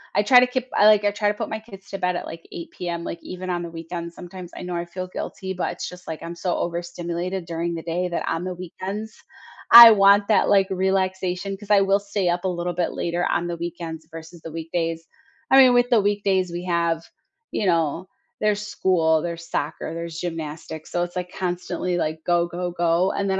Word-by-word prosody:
I 205 Hz, -, +3 dB
try 250 Hz, +4 st, +8 dB
to 250 Hz, -, +4 dB
keep 255 Hz, 0 st, -3 dB
I 205 Hz, -, +5 dB
like, 210 Hz, -1 st, +6 dB
I 205 Hz, -, +3 dB
try 205 Hz, 0 st, -1 dB
to -, -, +1 dB
put -, -, -5 dB
my 220 Hz, -, -3 dB
kids 200 Hz, -3 st, -14 dB
to 195 Hz, -, -4 dB
bed 180 Hz, -1 st, 0 dB
at, -, -, -4 dB
like, 165 Hz, 0 st, -9 dB
8:00 170 Hz, -, -8 dB
PM, 170 Hz, -1 st, -4 dB
like, 170 Hz, -, -5 dB
even 185 Hz, 0 st, -7 dB
on 175 Hz, -1 st, -1 dB
the 170 Hz, -, -6 dB
weekends, 170 Hz, +1 st, -7 dB
sometimes. 180 Hz, 0 st, -9 dB
I -, -, -7 dB
know 180 Hz, -1 st, -4 dB
I 170 Hz, 0 st, -2 dB
feel 185 Hz, +1 st, -6 dB
guilty, 190 Hz, +1 st, -5 dB
but 180 Hz, -, -2 dB
it's -, -, -6 dB
just, 180 Hz, 0 st, -13 dB
like, 160 Hz, -, -6 dB
I'm 170 Hz, +1 st, -6 dB
so 175 Hz, 0 st, -1 dB
overstimulated 175 Hz, +1 st, -3 dB
during 170 Hz, 0 st, -3 dB
the 165 Hz, -, -5 dB
day 175 Hz, +2 st, -1 dB
that 170 Hz, -, -3 dB
on 165 Hz, +1 st, -1 dB
the 185 Hz, 0 st, -3 dB
weekends, 195 Hz, +5 st, -6 dB, 0.6 s
I 235 Hz, 0 st, +13 dB
want 200 Hz, -1 st, +5 dB
that, 210 Hz, -3 st, +3 dB
like, 195 Hz, -1 st, +4 dB
relaxation 190 Hz, 0 st, -1 dB
'cause 205 Hz, +1 st, -8 dB
I 200 Hz, -1 st, +6 dB
will 195 Hz, +1 st, +3 dB
stay 200 Hz, -2 st, -1 dB
up 175 Hz, +1 st, -1 dB
a -, -, +2 dB
little 175 Hz, 0 st, -2 dB
bit 175 Hz, -, -1 dB
later 175 Hz, +1 st, -1 dB
on 175 Hz, -, 0 dB
the 170 Hz, -, -4 dB
weekends 165 Hz, -2 st, -6 dB
versus 165 Hz, +1 st, -10 dB
the 160 Hz, -, -8 dB
weekdays. 165 Hz, 0 st, -3 dB, 0.4 s
I 270 Hz, -, +7 dB
mean, 260 Hz, -2 st, +8 dB
with 245 Hz, 0 st, +3 dB
the 235 Hz, -4 st, +4 dB
weekdays 200 Hz, -3 st, +1 dB
we 175 Hz, +1 st, -5 dB
have 170 Hz, -2 st, 0 dB, 0.5 s
you 210 Hz, -, -1 dB
know, 165 Hz, +1 st, +1 dB, 0.3 s
there's 210 Hz, -1 st, +1 dB
school, 165 Hz, -6 st, +2 dB
there's 170 Hz, 0 st, -5 dB
soccer, 155 Hz, +2 st, -3 dB
there's 170 Hz, 0 st, -6 dB
gymnastics, 160 Hz, -2 st, -6 dB
so, 175 Hz, -, 0 dB
it's, 175 Hz, +1 st, -6 dB
like, 180 Hz, 0 st, -4 dB
constantly, 180 Hz, 0 st, -2 dB
like, 160 Hz, 0 st, -2 dB
"Go, 175 Hz, -1 st, +2 dB
go, 175 Hz, +1 st, -4 dB
go," 175 Hz, +2 st, +2 dB
and 200 Hz, -1 st, -2 dB
then 190 Hz, 0 st, +1 dB
180 Hz, 225 wpm, -23 LUFS, 170-195 Hz, 0.6 s, I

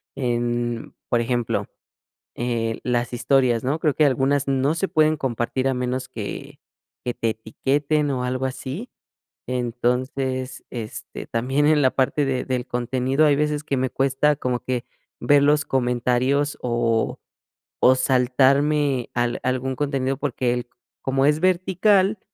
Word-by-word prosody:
en, 120 Hz, -2 st, -2 dB, 0.2 s
por 120 Hz, -, +2 dB
ejemplo, 120 Hz, -1 st, -1 dB, 0.7 s
eh, 115 Hz, -2 st, -2 dB
las 120 Hz, -1 st, 0 dB
historias, 120 Hz, -1 st, +2 dB
¿no?, 140 Hz, +5 st, 0 dB
creo 150 Hz, -3 st, +1 dB
que 155 Hz, -, +3 dB
algunas 135 Hz, +1 st, +1 dB
no 135 Hz, +3 st, +2 dB
se 190 Hz, +3 st, -1 dB
pueden 155 Hz, 0 st, +3 dB
compartir 130 Hz, 0 st, -1 dB
a 130 Hz, -, +1 dB
menos 125 Hz, +1 st, -2 dB
que -, -, -7 dB, 0.5 s
que 120 Hz, -, -2 dB
te 115 Hz, -2 st, 0 dB
etiqueten 140 Hz, +7 st, -1 dB
o 125 Hz, -2 st, -1 dB
algo 130 Hz, +1 st, -1 dB
así. 135 Hz, -, -6 dB, 0.6 s
Entonces, 125 Hz, +2 st, -2 dB
este, 115 Hz, -3 st, -7 dB
también 135 Hz, +5 st, +1 dB
en 155 Hz, -1 st, +4 dB
la 130 Hz, -2 st, +4 dB
parte 140 Hz, +2 st, +1 dB
de 130 Hz, -2 st, -1 dB
del 125 Hz, -2 st, -2 dB
contenido 130 Hz, +4 st, 0 dB
hay 145 Hz, -2 st, +4 dB
veces 150 Hz, 0 st, 0 dB
que 140 Hz, -, -1 dB
me 130 Hz, 0 st, 0 dB
cuesta 135 Hz, +3 st, +2 dB
como 125 Hz, -3 st, -1 dB
que 125 Hz, -2 st, -3 dB, 0.3 s
ver 145 Hz, -1 st, +4 dB
los 150 Hz, +1 st, +3 dB
comentarios 130 Hz, +3 st, +1 dB
o 120 Hz, -2 st, 0 dB, 0.6 s
o 130 Hz, -, +6 dB
saltarme 130 Hz, +1 st, +2 dB
al 120 Hz, 0 st, 0 dB
algún 130 Hz, +1 st, -1 dB
contenido 135 Hz, -1 st, -1 dB
porque 130 Hz, -3 st, -1 dB
el 125 Hz, 0 st, -3 dB, 0.3 s
como 135 Hz, 0 st, +1 dB
es 150 Hz, +1 st, +3 dB
vertical, 185 Hz, +3 st, +2 dB
130 Hz, 140 wpm, -23 LUFS, 125-145 Hz, 0.7 s, o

